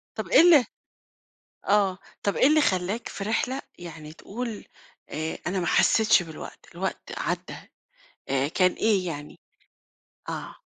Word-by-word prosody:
طَب - - -4
إيه - - +7
ال 325 -7 +7 1.0
آه، 200 -2 +3 0.2
طَب 200 - 0
إيه - - +5
اللي 310 +2 +5
خلاك 190 -1 0
في 195 - -6
رحلة 250 +5 -1 0.2
يعني 160 -3 -9
تقول 225 +6 -6 0.4
آآ، 155 +2 -4
أنا 185 +1 -1
ما 175 - -2
حسيتش 220 -4 +4
بالوقت، 160 -2 -10
الوقت - - -4
عدّى - - -3 0.7
آآ، 135 +1 +1
كان 185 +3 +3
إيه 200 -4 +1
يعني؟ 150 -3 -6 0.9
آه. - - -6
195 Hz, 135 wpm, -26 LUFS, 165-225 Hz, 1.0 s, إيه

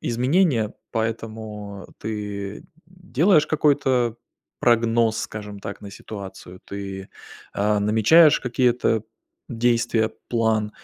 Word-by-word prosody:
изменения. 125 - +1 0.2
Поэтому 110 -3 -5
ты 105 -2 -5 0.2
делаешь 175 -2 +2
какой-то 135 -6 +2 0.5
прогноз, 115 -1 +3
скажем 105 -1 -6
так, 100 +1 -7
на 100 -1 -9
ситуацию. 95 -3 -9
Ты, 95 -1 -7 0.4
а, 105 0 +1
намечаешь 110 +10 +5
какие-то 120 -3 +1 0.5
действия, 115 -1 +1 0.2
план. 110 -2 +1
110 Hz, 90 wpm, -23 LUFS, 105-125 Hz, 0.5 s, намечаешь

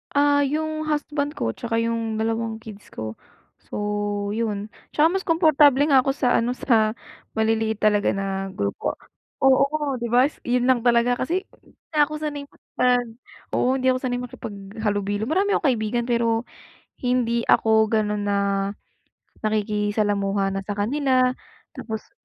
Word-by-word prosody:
Ah, 285 0 +4
yung 310 +2 -1
husband 295 0 -2
ko, 115 - -1
tsaka 230 - -3
yung 230 -1 -1
dalawang 225 0 -1
kids 215 -2 -12
ko. 110 0 -6 0.6
So, - - -6 0.6
'yon. 215 -2 -3 0.2
Tsaka 300 - +3
mas 385 - 0
komportable 300 -4 +5
nga 275 -3 +5
ako 270 - 0
sa 250 - +2
ano, 245 +2 +1
sa 220 -2 +2 0.4
maliliit 220 0 +1
talaga 210 -1 +2
na 195 0 -2
grupo. 100 - -3 0.4
Oo, 275 +2 +2
'di 235 - -2
ba, 245 +3 +5
s 295 - -6
'yon 245 0 0
lang 255 -2 +3
talaga, 240 +1 +3
kasi 340 +10 -2 0.2
hindi - - -25 0.2
na 295 -1 +4
ako 305 - -6
sanay 300 -2 -4
makipag 245 -1 0 0.5
oo, - - +2
hindi 260 - -1
ako 255 - -2
sanay 245 -2 -1
makipaghalubilo. 205 -3 -4
Marami 390 +5 +2
akong 315 - +1
kaibigan, 235 0 -1
pero 230 -1 +2 0.6
hindi 245 -2 +1
ako 220 -1 +4
gano'n 210 -1 0
na, 205 0 0 1.1
nakikisalamuha 205 -2 0
na 195 0 -2
sa 205 - -3
kanila, 255 +4 +2 0.4
tapos 220 -1 -6
235 Hz, 145 wpm, -23 LUFS, 215-275 Hz, 1.1 s, komportable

